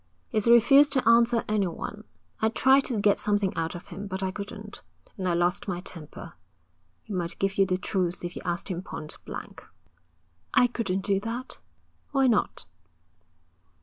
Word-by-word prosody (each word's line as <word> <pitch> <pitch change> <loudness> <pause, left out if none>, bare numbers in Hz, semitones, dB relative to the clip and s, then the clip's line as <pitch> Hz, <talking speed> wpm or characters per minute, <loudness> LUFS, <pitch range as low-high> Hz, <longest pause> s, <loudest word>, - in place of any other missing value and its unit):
'He's 215 -1 0
refused 275 +5 +7
to 260 -5 +1
answer 230 0 +5
anyone. 210 +1 -2 0.4
I 220 - +3
tried 265 +4 +4
to 230 -4 -1
get 200 0 +3
something 205 -2 0
out 165 +1 -2
of 175 - -10
him, 195 +4 -6
but 190 0 -4
I 190 - 0
couldn't, 205 +1 -8 0.3
and 185 -2 -3
I 175 - +2
lost 175 +4 0
my 180 -3 -2
temper. 165 -4 -9 0.7
He 215 - -8
might 175 -2 -2
give 195 0 -1
you 195 - +5
the 185 -1 +1
truth 180 -2 -2
if 175 - -5
you - - -6
asked 175 +3 -3
him 180 -2 -3
pointblank.' 155 -4 -7 0.9
'I 245 - +6
couldn't 195 -5 -1
do 195 -2 +2
that.' 230 +5 -4 0.5
'Why 270 -1 +4
not?' 235 -5 +1
200 Hz, 165 wpm, -27 LUFS, 180-230 Hz, 0.9 s, refused